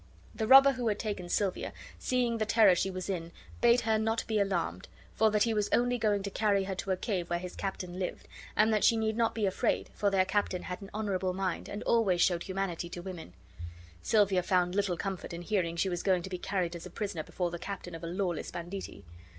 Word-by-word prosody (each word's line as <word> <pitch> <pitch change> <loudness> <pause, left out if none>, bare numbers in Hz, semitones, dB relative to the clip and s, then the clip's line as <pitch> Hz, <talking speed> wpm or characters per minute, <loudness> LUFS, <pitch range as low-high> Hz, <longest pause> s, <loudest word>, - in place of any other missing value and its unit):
The 220 - -2
robber 270 +2 +9
who 250 -3 -3
had 210 -2 +1
taken 200 -6 -4
Silvia, 195 0 -1 0.3
seeing 245 -2 0
the 215 - +1
terror 215 -4 +6
she 190 +2 0
was 185 -1 -5
in, 170 -4 -3 0.3
bade 240 +1 +5
her 220 -1 +1
not 225 +1 0
be 220 -2 0
alarmed, 175 - -1 0.3
for 220 0 +3
that 210 -1 +3
he 230 - +1
was 210 -1 0
only 245 0 +2
going 205 -3 +1
to 200 - -4
carry 200 -1 +2
her 190 0 -3
to 195 +1 -5
a 190 - +1
cave 180 -5 -2
where 175 - +1
his 180 +1 -7
captain 185 -2 -4
lived, 185 - -4 0.3
and 220 +1 +4
that 210 - +2
she 230 - +5
need 220 -1 0
not 230 0 +1
be 220 -2 0
afraid, 200 +4 0
for 205 - +1
their 190 -1 +3
captain 190 -2 -1
had 180 +2 -6
an 195 - -9
honorable 195 -3 -1
mind 185 -2 -2
and 205 - -5
always 205 -7 +2
showed 170 0 +3
humanity 185 -3 -3
to 175 - -7
women. 175 - -8 0.7
Silvia 200 -4 +3
found 180 0 +1
little 195 -3 0
comfort 190 -2 -4
in 170 +1 -6
hearing 175 -4 0
she 170 +3 +1
was 175 -2 -2
going 185 -3 +2
to 190 - -7
be 180 - -3
carried 180 -2 -2
as 170 +1 -7
a - - -11
prisoner 200 -3 -4
before 175 +2 -3
the 170 - -5
captain 190 -2 -6
of 165 0 -8
a - - -3
lawless 175 -1 -2
banditti. 175 - -7
195 Hz, 230 wpm, -30 LUFS, 180-215 Hz, 0.7 s, robber